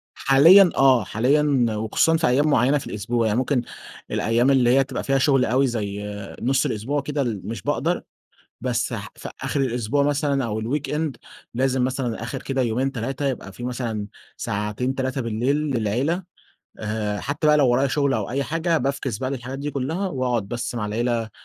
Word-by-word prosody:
حاليًا 170 +8 +7
آه، 130 -5 +5
حاليًا 135 +4 +2
وخصوصًا 110 +9 +2
في 160 - +1
أيام 140 +5 +3
معيّنة 135 +2 +3
في - - -6
الأسبوع، 115 +2 -1
يعني 105 +2 +1
ممكن 130 -1 +1 0.5
الأيام 120 +4 +2
اللي 125 -3 +4
هي 135 - +5
بتبقى 130 -1 -5
فيها 135 0 +1
شغل 135 -1 +3
أوي 130 +3 +2
زي 105 -3 -3 0.4
نُصّ 135 +2 +2
الأسبوع 135 +7 -1
كده، 145 +1 -2
ال 110 -7 -3
مش 115 - -5
باقدر - - 0 0.6
بس 125 -1 -1
ح 100 -3 -5
في - - -8
آخر 140 - -1
الأسبوع 125 +2 0
مثلًا 140 -2 +1
أو 110 0 -3
الweekend 150 +5 -2 0.4
لازم 130 +1 +1
مثلًا 125 -3 -2
آخر 130 +3 -5
كده 135 -1 -1
يومين 125 +3 0
3 135 +4 -3
يبقى 115 -7 -4
في 120 - -10
مثلًا 115 -4 -3 0.3
ساعتين 105 +6 -2
3 130 0 -2
بالليل 115 +5 0
للعيلة 140 - -1 0.6
آآ، 105 -1 -2
حتى 145 +2 -1
بقى 150 0 +6
لو 140 -3 +4
ورايا 135 +3 +3
شغل 140 0 +1
أو - - -2
أي 140 +3 -1
حاجة 165 +2 0
بافكِس 135 -6 -2
بقى 130 +1 -3
للحاجات 130 +1 -5
دي 145 +1 -3
كلّها، 160 +9 -2
وأقعد 125 - -1
بس 120 +1 -4
مع 105 -3 -2
العيلة 115 +1 -1
130 Hz, 180 wpm, -23 LUFS, 115-140 Hz, 0.6 s, حاليًا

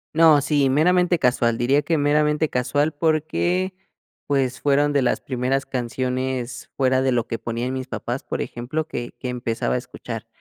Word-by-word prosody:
No, 160 -3 +6
sí, 145 -1 +2
meramente 175 +5 +3
casual. 120 -4 +2
Diría 135 +5 +2
que 165 +1 0
meramente 150 +1 +2
casual, 145 +4 0
porque 165 +4 0 0.5
pues, 135 -3 0
fueron 145 +1 +2
de 140 - +3
las 125 - +1
primeras 130 +1 -1
canciones 125 0 -3
fuera 130 -1 +3
de 130 0 +2
lo 120 -2 +1
que 115 - -3
ponían 120 +2 -3
mis 130 0 -4
papás, 120 +2 -4
por - - -4
ejemplo, 150 +7 -4
que 120 -5 -6
que 125 - -4
empezaba 120 -2 -2
a - - +2
escuchar. 115 -2 -8
130 Hz, 165 wpm, -23 LUFS, 125-150 Hz, 0.5 s, No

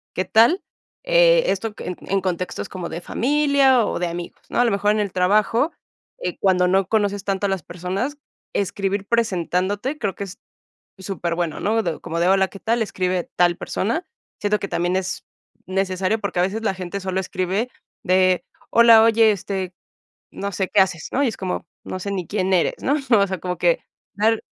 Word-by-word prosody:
qué 185 - 0
tal, 235 - +4 0.4
eh, - - +5
esto 210 +2 -1
en 180 - -5
en 195 0 -1
contextos 180 -1 -3
como 180 -3 -6
de 170 - -5
familia 275 0 +3
o - - -2
de 180 - 0
amigos, 170 0 -7
¿no? - - -1
A 245 - +5
lo 230 - +2
mejor 200 +1 +2
en 215 - +1
el 200 -3 -1
trabajo, 215 - +2 0.5
eh, - - -4
cuando 180 -2 +3
no 190 +1 +2
conoces 205 -2 0
tanto 200 0 -1
a - - -2
las 190 -4 -2
personas, 185 - -4 0.4
escribir 200 0 -1
presentándote, 205 - 0
creo 200 -4 -2
que 200 - -5
es 195 +1 -11 0.6
súper 185 -3 -3
bueno, 170 -3 -2
¿no? 210 -6 0
Como 170 0 -4
de: 175 - +3
"Hola, 190 0 +4
¿qué 195 - -12
tal?" 230 +1 +1
Escribe 185 -4 -2
tal 175 -1 +3
persona. 235 - -2 0.3
Siento 210 0 +1
que 200 - -4
también 175 +2 0
es 190 -1 -3 0.4
necesario 190 +2 0
porque 200 -4 -3
a - - +4
veces 205 +5 -1
la 195 - 0
gente 185 +2 -5
solo 190 0 -2
escribe 190 +5 -2 0.4
de, 185 0 +3 0.3
hola, 230 -1 +7
oye, 225 -1 +5
este, 190 -2 -4 0.6
no 200 0 -4
sé 190 0 -1
qué 210 - +3
haces, 165 -4 -1
¿no? 280 - +1
Y 275 - +3
es 220 - -7
como, 185 -1 -3 0.2
no 185 - -5
sé 200 +2 -4
ni 185 -3 -3
quién 190 -2 0
eres, 180 - +2
¿no? 280 - +2 0.2
O 200 - +3
sea, 190 -2 -4
como 180 0 -3
que - - +2 0.3
dar, 220 +2 +1
195 Hz, 195 wpm, -22 LUFS, 185-220 Hz, 0.6 s, hola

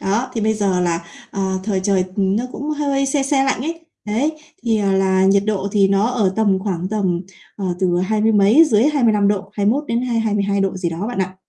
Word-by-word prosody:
Đó, 220 +7 -1
thì 225 - -1
bây 220 +1 +1
giờ 195 -4 0
là, 170 -1 0 0.3
ờ, 195 - -5 0.2
thời 195 -3 -1
trời 190 -1 +1
nó 200 +4 +1
cũng 295 +2 -5
hơi 280 -2 0
se 275 0 0
se 270 0 +1
lạnh 270 - 0
ấy, 330 +4 -4 0.2
đấy, 235 +9 0 0.3
thì, 225 -2 +1
à, 200 -1 +1
là 190 0 +2
nhiệt 195 +1 +4
độ 200 -2 -1
thì 200 -2 +3
nó 195 +2 +2
ở 225 -6 0
tầm 205 -4 +2
khoảng 185 -3 -3
tầm, 190 -5 -1 0.4
ờ, 200 - -5
từ 180 -2 +1
hai 215 +3 0
mươi 220 +1 +3
mấy, 210 +10 +6
dưới 230 -7 +2
25 220 -7 +2
độ, 200 -1 -2
21 215 +8 0
đến 235 -1 -1
hai 245 -2 -1
hai 220 -2 -1
mươi 205 - +1
hai 200 0 0
độ 190 -1 -1
gì 175 -2 -2
đó 170 +5 -4
bạn 245 - -5
ạ. 185 0 -2
205 Hz, 240 wpm, -19 LUFS, 190-235 Hz, 0.4 s, mấy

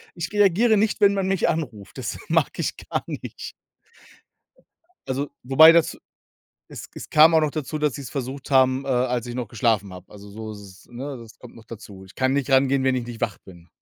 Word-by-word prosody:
ich 170 +2 -5
reagiere 210 +2 +3
nicht, 215 +1 0
wenn 200 0 +5
man 195 -1 -1
mich 190 -1 +1
anruft. 130 -11 -5
Das - - -5
mag - - +2
ich - - -2
gar - - -2
nicht. - - -7 1.6
Also, 135 +2 -3
wobei 135 +6 +8
das 165 -1 +2 0.7
es - - -10
es - - -10
kam 155 +2 +6
auch 160 - +6
noch 155 -1 +1
dazu, 155 0 -4
dass 150 -3 0
sie's 135 -4 -8
versucht 135 0 -6
haben, 130 0 +3
äh, - - -7
als 125 -2 0
ich 120 - -6
noch 125 -2 -4
geschlafen 105 -3 0
habe. 90 0 -13
Also, 100 0 -13
so 110 +1 -8
ist's, 100 -3 -13
ne? 130 +3 -7
Das 115 -1 -14
kommt 125 - -14
noch 115 - -14
dazu. 100 -4 -11
Ich 95 - -17
kann 130 0 0
nicht 140 -2 -1
rangehen, 135 0 +3
wenn 130 -1 +2
ich 125 - -3
nicht 120 -2 -9
wach 100 - -2
bin. 85 -2 -16
130 Hz, 210 wpm, -23 LUFS, 115-155 Hz, 1.6 s, wobei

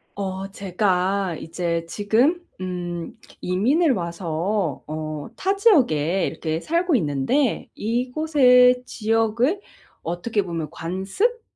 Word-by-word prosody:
어, 195 -1 -4
제가 190 -1 0
이제 170 0 -2
지금 225 - +2 0.2
음 175 -2 -5 0.2
이민을 265 - +2
와서 170 - -2
어 155 +1 -4 0.3
타 390 +1 0
지역에 195 - +3
이렇게 160 0 -3
살고 340 - +1
있는데 160 - 0
이곳의 250 +1 +3
지역을 225 - +1 0.4
어떻게 200 +5 -1
보면 165 -4 -4
관습, 190 - -2
200 Hz, 205 characters per minute, -23 LUFS, 170-250 Hz, 0.4 s, 지역에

